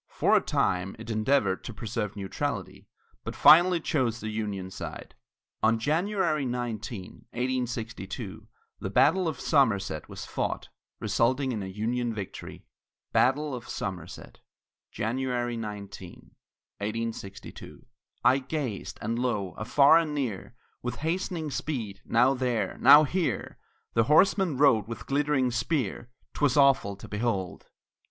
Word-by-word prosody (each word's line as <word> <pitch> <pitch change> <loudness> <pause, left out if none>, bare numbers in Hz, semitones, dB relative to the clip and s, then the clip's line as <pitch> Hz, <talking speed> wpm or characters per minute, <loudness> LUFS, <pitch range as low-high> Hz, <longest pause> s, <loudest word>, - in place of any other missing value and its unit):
For - - +2
a - - +5
time, 90 +1 0
it 115 +1 -7
endeavored 110 -3 +1
to 120 - -7
preserve 110 -2 -4
neutrality, 95 -2 -4 0.4
but - - -6
finally 175 +2 +7
chose 130 -8 0
the 110 -1 -4
Union 100 -4 -4
side. - - -7 0.5
On 115 +1 +3
January 165 - 0
19, 120 -5 -5
1862, 120 -4 -4 0.3
the - - -4
battle 180 +3 +3
of 160 - -3
Somerset 100 - +1
was - - -7
fought, - - -3 0.3
resulting 130 +3 +1
in 110 -4 -3
a 95 - -5
Union 115 +4 -2
victory. 100 -3 -8 0.5
BATTLE 145 +3 +2
OF 125 -2 -7
SOMERSET 90 -3 -6 0.5
[January 120 +1 -2
19, 105 -3 -8 0.5
1862] 105 +1 -6 0.4
I 130 +2 +5
gazed, 130 - -4
and 115 +2 -1
lo! 105 -7 -1
Afar 140 +8 +5
and 155 -3 -2
near, 120 -5 -3 0.3
With 125 0 -3
hastening 165 -2 -2
speed, 115 -11 -4
now 125 +3 +4
there, 120 -7 -1
now 150 +1 +9
here, 170 +4 -2 0.3
The 115 -1 +3
horseman 175 - +4
rode 125 -7 +4
with 115 - -7
glittering 140 -2 +1
spear 125 - -2 0.2
'Twas 145 -2 +1
awful 135 -8 +4
to 100 - -11
behold! 105 -5 -2
120 Hz, 125 wpm, -28 LUFS, 105-140 Hz, 0.5 s, now